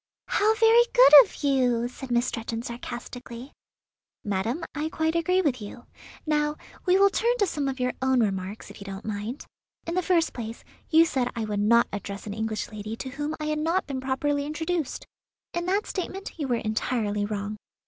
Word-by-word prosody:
"How 435 +2 +3
very 450 +2 +6
good - - +8
of 395 - -11
you!" 250 -4 +2
said 255 +1 -9
Miss 240 0 +2
Stretton 230 0 -4
sarcastically. 240 +1 -7 0.7
"Madam, 210 - -2
I 305 +1 -2
quite 320 +1 -1
agree 365 +3 +2
with 255 -7 0
you. 210 +4 -9 0.4
Now 300 -1 +1 0.3
we 365 +1 +5
will 395 0 +5
turn 475 +3 +1
to 415 - +3
some 295 -6 -2
of 265 -1 -3
your 250 0 0
own 260 -1 +3
remarks, 195 0 -3
if - - -13
you - - -8
don't 195 +1 -7
mind. 215 +5 -4 0.4
In 335 - -3
the 365 - +1
first 340 -2 +2
place, 230 -1 -7 0.3
you 325 0 +6
said 260 -7 0
I 230 -1 -2
would 210 -1 -2
not 235 +3 +4
address 200 0 -5
an 205 - -5
English 220 0 -3
lady 215 +1 -6
to 260 - -6
whom 295 +3 -4
I 305 - -3
had 305 0 -1
not 335 +4 +1
been 270 -2 -4
properly 285 +2 0
introduced. 320 +1 -3 0.5
In 345 +1 -2
that 395 +3 +1
statement 385 +1 -5
you 290 - -1
were 245 - +1
entirely 215 -2 -1
wrong. 205 0 -3
260 Hz, 190 wpm, -26 LUFS, 225-320 Hz, 0.7 s, good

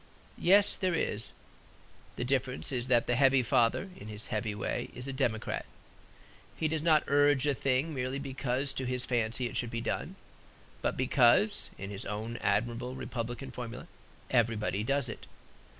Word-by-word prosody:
Yes; 200 +3 +5
there 185 -3 +1
is. 110 -8 -1 0.8
The - - -3
difference 130 +1 -1
is 125 -2 -2
that 120 -2 +4
the 120 - +1
heavy 135 0 +5
father, 120 +11 +2
in 105 - -10
his 105 0 -6
heavy 105 -1 -1
way, 105 - -2
is 125 +2 -6
a 135 - -3
democrat. 120 -5 -1 0.9
He 160 - +1
does 155 0 -1
not 155 -2 +4
urge 145 -1 +4
a 145 - +3
thing 135 +4 0
merely 130 0 -2
because 135 -1 -2
to 130 - -3
his 125 0 -2
fancy 115 0 0
it 120 - -4
should 120 - 0
be 115 0 -3
done; 115 - -3 0.7
but, - - -1
because 130 - +4
(in 95 +1 -6
his 100 - -6
own 110 +3 -4
admirable 120 +3 0
republican 120 +1 -5
formula) 125 -1 -6 0.5
"Everybody 110 -5 +1
does 140 +2 +1
it." 110 - -8
125 Hz, 165 wpm, -31 LUFS, 115-140 Hz, 0.9 s, Yes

